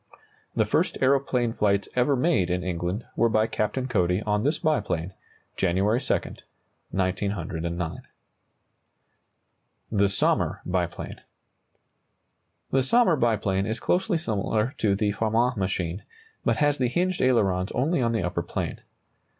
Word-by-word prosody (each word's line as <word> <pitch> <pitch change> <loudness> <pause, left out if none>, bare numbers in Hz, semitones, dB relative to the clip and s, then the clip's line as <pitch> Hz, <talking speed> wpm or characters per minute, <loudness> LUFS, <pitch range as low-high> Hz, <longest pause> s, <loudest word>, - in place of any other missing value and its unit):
The - - +3
first - - +1
aeroplane 130 -3 +2
flights 100 -2 +1
ever 125 +3 +3
made 130 - +2
in 90 0 -1
England 90 +4 -3
were 115 - +3
by 110 0 +3
Captain 120 +4 -2
Cody 90 -4 +1
on 105 0 0
this 150 +4 +1
biplane, 95 - -1 0.4
January 95 +6 +2
2, - - -2 0.8
1909. 90 -3 -2 1.9
THE 100 -2 +3
SOMMER 100 - +1
BIPLANE. 90 -1 -3 1.5
The 135 - +3
Sommer 185 - +4
biplane 105 -6 +1
is 110 +1 -2
closely 185 0 +1
similar 110 - -1
to 100 -2 +2
the 105 0 +1
Farman 115 +4 +1
machine, 95 -2 -2 0.4
but - - +1
has 145 -2 +2
the 125 - +2
hinged 180 +6 0
ailerons 100 -8 +2
only 140 +4 +1
on 115 -1 +1
the 115 -5 0
upper 90 -1 -1
plane. 85 - -4
105 Hz, 125 wpm, -26 LUFS, 95-130 Hz, 1.9 s, Sommer